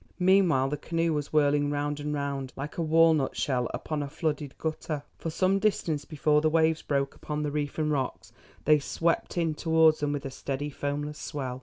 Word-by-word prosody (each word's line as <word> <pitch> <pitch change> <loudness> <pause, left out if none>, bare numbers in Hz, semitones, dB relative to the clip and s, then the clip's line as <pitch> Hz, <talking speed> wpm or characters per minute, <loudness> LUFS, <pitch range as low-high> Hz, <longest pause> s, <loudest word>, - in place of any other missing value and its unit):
Meanwhile 180 -8 +4
the 150 - -2
canoe 165 +1 -1
was 150 -1 -3
whirling 145 -1 +3
round 145 0 -2
and 150 +1 -3
round 140 -2 -3
like 145 +5 -6
a - - +2
walnut 160 -3 +3
shell 125 -3 0
upon 155 -2 -3
a 140 - -4
flooded 150 -2 -3
gutter. 155 -2 -3 0.2
For 165 - -3
some 185 +4 +2
distance 165 -8 0
before 150 -1 +2
the 155 - +3
waves 160 0 +2
broke 140 -1 -1
upon 150 0 -4
the 150 - -2
reef 145 -1 -3
and 155 -1 0
rocks 135 -3 -3 0.3
they 150 0 +6
swept 165 +5 -1
in 165 -2 +1
towards 160 0 +4
them 145 0 0
with 145 -1 -3
a 135 - -4
steady 140 +2 -4
foamless 145 +1 -3
swell. 130 -4 -4
150 Hz, 195 wpm, -28 LUFS, 145-160 Hz, 0.3 s, they